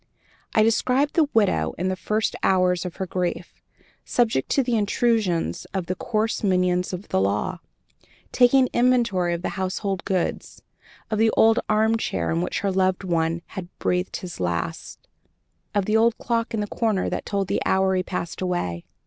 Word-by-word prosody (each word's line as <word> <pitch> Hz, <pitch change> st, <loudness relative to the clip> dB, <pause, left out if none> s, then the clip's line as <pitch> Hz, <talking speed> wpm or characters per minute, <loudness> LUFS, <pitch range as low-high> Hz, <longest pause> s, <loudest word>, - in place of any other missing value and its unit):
I 215 Hz, -, +5 dB
described 255 Hz, +6 st, +2 dB
the 310 Hz, -4 st, +3 dB
widow 80 Hz, -, +2 dB
in 185 Hz, +2 st, -1 dB
the 185 Hz, -, -1 dB
first 215 Hz, +3 st, -1 dB
hours 180 Hz, -1 st, +2 dB
of 180 Hz, -, -5 dB
her 190 Hz, -, -3 dB
grief, 180 Hz, -1 st, -4 dB, 0.4 s
subject 225 Hz, -, 0 dB
to 275 Hz, -, +2 dB
the 240 Hz, -1 st, 0 dB
intrusions 205 Hz, -, 0 dB
of 190 Hz, -2 st, -1 dB
the 185 Hz, -, -2 dB
coarse 220 Hz, +4 st, -2 dB
minions 180 Hz, -2 st, +1 dB
of 185 Hz, +2 st, -7 dB
the 95 Hz, -, +1 dB
law, 105 Hz, -, -1 dB, 0.7 s
taking 255 Hz, +1 st, +5 dB
inventory 235 Hz, -8 st, +2 dB
of 170 Hz, -, -7 dB
the -, -, -1 dB
household 190 Hz, +1 st, -2 dB
goods, 185 Hz, -2 st, -3 dB, 0.5 s
of 215 Hz, -, 0 dB
the 225 Hz, 0 st, +4 dB
old 225 Hz, +1 st, +5 dB
armchair 220 Hz, +1 st, +1 dB
in 165 Hz, +1 st, 0 dB
which 180 Hz, -, -2 dB
her 200 Hz, -, 0 dB
loved 185 Hz, 0 st, +1 dB
one 170 Hz, -1 st, 0 dB
had 185 Hz, -4 st, -7 dB
breathed 180 Hz, +1 st, -1 dB
his 180 Hz, -2 st, -8 dB
last, 85 Hz, -2 st, -4 dB, 0.7 s
of 200 Hz, -2 st, +2 dB
the 215 Hz, +2 st, +2 dB
old 230 Hz, +1 st, +3 dB
clock 230 Hz, -1 st, -1 dB
in 215 Hz, -, -1 dB
the -, -, -1 dB
corner 210 Hz, -2 st, -1 dB
that -, -, -3 dB
told 200 Hz, -2 st, -1 dB
the -, -, -1 dB
hour 190 Hz, 0 st, +2 dB
he 185 Hz, -, +2 dB
passed 175 Hz, -1 st, -5 dB
away. 135 Hz, -, -2 dB
190 Hz, 175 wpm, -24 LUFS, 180-220 Hz, 0.7 s, I